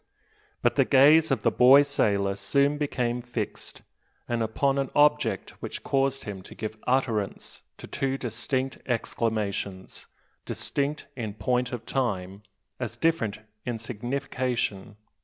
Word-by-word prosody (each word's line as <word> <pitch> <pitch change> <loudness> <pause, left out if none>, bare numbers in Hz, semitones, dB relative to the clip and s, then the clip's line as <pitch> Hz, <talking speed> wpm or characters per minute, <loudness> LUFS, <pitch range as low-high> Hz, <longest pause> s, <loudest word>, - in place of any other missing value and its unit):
But - - +2
the - - +6
gaze 150 +4 +6
of 135 - 0
the 115 - +3
boy 130 +5 +7
sailor 100 -8 +1
soon 140 +9 +1
became 125 -4 -1
fixed; 120 -3 -5 0.4
and 120 -1 -1
upon 135 +5 +1
an 135 - -1
object 150 0 +3
which - - -5
caused 135 0 0
him 100 -2 -6
to - - -13
give 110 0 -5
utterance 120 -6 -1 0.2
to - - -9
two 135 -1 -2
distinct 130 +2 -2
exclamations, 105 -5 -2 0.4
distinct 145 +2 -2
in 110 -5 -5
point 125 +3 0
of 120 -2 -5
time, 100 -7 -2 0.4
as 120 -2 -4
different 120 -9 0 0.2
in 120 -2 -3
signification. 120 -3 -3
125 Hz, 130 wpm, -27 LUFS, 110-135 Hz, 0.4 s, boy